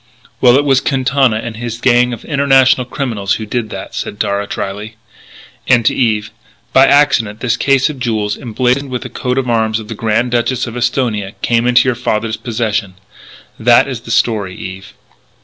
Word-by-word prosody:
"Well, 125 -1 +6
it 145 +2 +2
was 135 -2 +3
Quintana 135 -3 +1
and 110 0 -5
his 115 0 -5
gang 125 0 +3
of 120 - -7
international 135 -3 +3
criminals 115 -7 -2
who 110 - -5
did 110 +1 -3
that," - - -8
said - - -5
Darragh 100 0 -2
drily. 105 +3 -5 0.7
And, 120 -3 +4
to - - +3
Eve: 110 -3 0 0.4
"By 135 +1 +6
accident 135 -8 +3
this 120 -1 +1
case 135 -1 +2
of 150 -3 -6
jewels, 110 -4 -1
emblazoned 125 +3 -1
with 125 -1 -4
the - - -7
coat 125 0 -3
of 135 -1 0
arms 110 -2 +1
of 110 -1 -10
the - - -4
Grand 115 +3 0
Duchess 120 +1 0
of 120 -1 -7
Esthonia, 115 -5 -1
came 120 0 +1
into 125 +1 +4
your 130 - +2
father's 110 -2 -2
possession. 110 -4 -2 0.6
That - - +4
is - - -5
the - - -12
story, 105 -5 0
Eve." 95 +1 -9
120 Hz, 185 wpm, -15 LUFS, 110-130 Hz, 0.7 s, Well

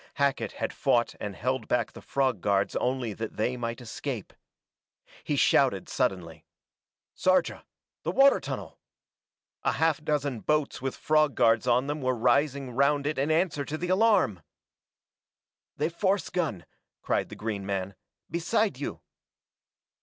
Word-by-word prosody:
Hackett 140 -6 0
had - - -3
fought 120 -1 +1
and 100 -2 -5
held 130 +8 -2
back 120 -1 0
the - - -12
frog 130 -8 0
guards 100 -1 +1
only 125 -3 -1
that 110 +1 -6
they 120 +4 0
might 115 -1 -4
escape. 120 -1 -5 0.9
He - - -1
shouted - - +3
suddenly. 85 -4 -2 0.7
"Sarja 185 0 +1 0.4
the - - -3
water 275 0 +5
tunnel!" - - -6 0.8
A - - +1
half 160 -2 +1
dozen 145 -5 -1
boats 150 +2 0
with 135 0 -3
frog 155 -2 +2
guards 115 +1 +3
on 125 +2 +3
them 145 +1 -3
were 130 -1 +1
rising 130 +3 +1
round 140 +3 +2
it 150 -1 -1
in 140 +3 +1
answer 160 -2 +1
to 155 +2 -4
the 180 +2 -4
alarm! 190 - +3 1.4
"The 155 +3 0
force 190 +3 0
gun!" 160 - -2 0.4
cried - - 0
the - - -8
green 105 -2 -4
man. 95 -1 -3 0.3
"Beside 175 - 0
you 145 - -5
135 Hz, 145 wpm, -28 LUFS, 115-155 Hz, 1.4 s, water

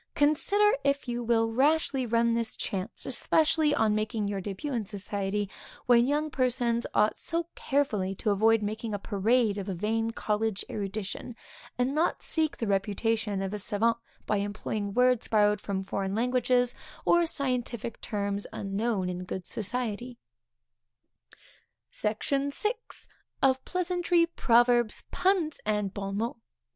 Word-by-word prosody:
Consider 400 +9 +3
if 280 -1 0
you 240 0 -2
will 225 -1 +2
rashly 275 0 +2
run 230 0 +2
this 230 -1 0
chance, 195 +3 -3
especially 305 +3 +2
on 220 -5 +2
making 215 0 -1
your 200 -1 -2
début 205 +9 -4
in 230 -3 0
society, 205 0 -1 0.4
when 240 0 +5
young 300 +2 0
persons 245 -2 +1
ought 210 +1 +3
so 335 0 0
carefully 215 -9 0
to 210 +2 0
avoid 220 +2 +3
making 215 +1 -3
a - - -1
parade 210 +2 +1
of 200 0 -5
a 190 - -2
vain 225 +5 0
college 215 -2 -1
erudition, 205 +3 -4 0.4
and 250 +2 +1
not 315 +3 +1
seek 315 -2 +1
the 230 - -2
reputation 205 0 0
of 195 +1 -3
a 210 - -3
savant 220 +3 +1 0.3
by 210 - +1
employing 205 0 -3
words 250 -1 +3
borrowed 210 -1 +3
from 195 -1 -3
foreign 195 +1 -2
languages, 250 +1 +2 0.3
or 345 -1 +4
scientific 250 -6 -2
terms 200 -2 -2
unknown 200 0 -1
in 180 0 -4
good 185 0 -5
society. 240 +2 -4 1.7
SECTION 275 +6 -1
VI. 420 - -1 0.7
_Of 260 -1 +3
Pleasantry, 355 -1 +1
Proverbs, 240 -7 +3
Puns, 365 -5 +1
and 210 -2 -1
Bon 195 0 -4
Mots. 230 +2 -2
225 Hz, 140 wpm, -28 LUFS, 205-260 Hz, 1.7 s, when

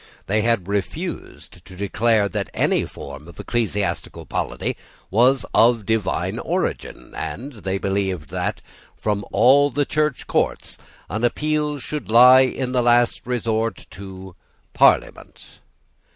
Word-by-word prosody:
They 110 +2 +1
had 110 -5 0
refused 100 -2 -5
to 95 - -13
declare 105 +2 +1
that - - -3
any - - +1
form 70 +2 -10
of 85 - -14
ecclesiastical 105 -4 -2
polity - - -3 0.4
was 125 +3 +3
of 115 -2 +4
divine 110 -2 -1
origin; - - -3
and 140 +5 -5
they 95 -4 -5
had 95 - -2
provided 95 -3 -1
that, - - -3 0.3
from 105 -1 -1
all 135 +7 +5
the 145 0 0
Church 150 -2 -1
courts, - - -2 0.3
an 110 +6 -4
appeal 150 +3 0
should 145 -1 -6
lie 125 +3 +8
in 130 0 -1
the 125 -1 +2
last 120 0 +3
resort 115 -4 -2
to 95 -1 -10 0.4
Parliament. - - +2
115 Hz, 130 wpm, -22 LUFS, 100-125 Hz, 0.4 s, lie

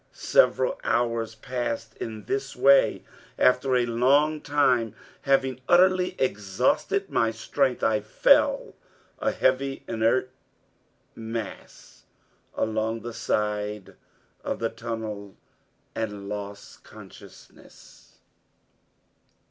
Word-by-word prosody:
Several - - +2
hours 115 -2 0
passed 115 -1 -4
in 110 -3 -7
this 135 +4 -3
way. 135 +2 +4 0.3
After 130 +1 +3
a 125 -1 +3
long 140 +6 +2
time, 125 -7 +1 0.3
having 135 -2 +1
utterly 185 +1 +4
exhausted 100 -7 0
my 115 - +2
strength, 125 +4 -1
I 110 -1 +3
fell 105 +1 +2 0.5
a - - +1
heavy 135 +1 0
inert 115 +3 +1 0.8
mass 115 -1 -8 0.5
along 110 +1 -1
the 120 0 -7
side 105 -2 -2 0.5
of - - -3
the 115 - -1
tunnel, 110 -4 -6 0.6
and 105 -3 -4
lost 100 0 -8
consciousness. - - -16
115 Hz, 90 wpm, -26 LUFS, 110-135 Hz, 0.8 s, way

